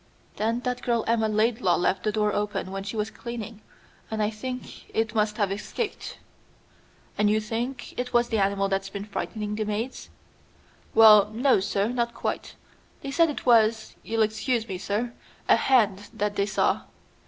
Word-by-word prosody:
Then 230 +3 0
that 250 -1 -2
girl 235 -2 0
Emma 225 -1 +2
Laidlaw 215 -3 +2
left 185 +1 +1
the 215 - 0
door 210 -1 +1
open 205 -2 -2
when 195 0 -4
she 195 +3 -5
was 215 0 -2
cleaning, 230 -2 -7 0.5
and 220 - -3
I 210 - 0
think 250 +4 -7
it 225 0 0
must 210 -1 +1
have 205 -3 +1
escaped." 410 - -4 1.0
"And 210 0 +4
you 215 +1 +3
think 240 +4 -4
it 250 0 -2
was 240 0 +2
the 225 - +1
animal 195 0 +1
that's 195 0 -1
been 200 +1 -6
frightening 210 0 -4
the 215 +1 -1
maids?" 215 +5 -4 0.9
"Well, 210 -2 +8
no, 245 +1 +3
sir, 200 +1 0
not 235 -1 -1
quite. - - -4 0.5
They 275 - -5
said 330 +3 +4
it 295 - -5
was 225 -2 +3
you'll 225 0 +1
excuse 220 +2 -1
me, 185 -3 -5
sir 220 +5 -2 0.3
a - - +7
hand 205 -6 +2
that 205 0 -2
they 200 0 +1
saw. 205 - +1
215 Hz, 175 wpm, -26 LUFS, 205-235 Hz, 1.0 s, Well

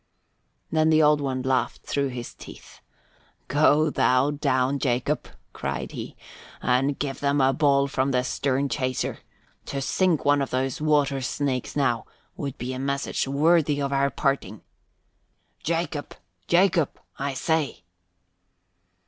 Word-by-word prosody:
Then 155 0 +3
the 155 0 +5
Old 150 0 +4
One 130 -2 -2
laughed 130 -1 0
through 140 -1 -1
his 125 -2 -6
teeth. - - -13 0.7
"Go 150 +1 +4
thou 130 +2 +3
down, 140 -2 +1
Jacob," 130 +3 0 0.3
cried - - -4
he, - - -7 0.4
"and 130 +3 +1
give 135 -2 -3
them 140 0 +1
a 135 0 +4
ball 140 -1 +3
from 135 0 0
the 125 -2 +1
stern 135 +2 0
chaser. 130 -2 -2 0.5
To 140 - -3
sink 170 +4 +1
one 145 0 +4
of 135 - -2
those 130 +2 -2
water 145 -3 +2
snakes, 130 -1 -2
now, 130 -6 0 0.3
would 140 -3 -5
be 125 +2 -4
a 130 - -5
message 140 0 -1
worthy 150 +1 +3
of 140 -1 -1
our 140 0 +2
parting. 135 -7 -2 1.0
Jacob! 165 -3 -2 0.3
Jacob, 175 -3 +2 0.2
I 140 0 -2
say!" 160 - -1
140 Hz, 135 wpm, -25 LUFS, 130-150 Hz, 1.0 s, the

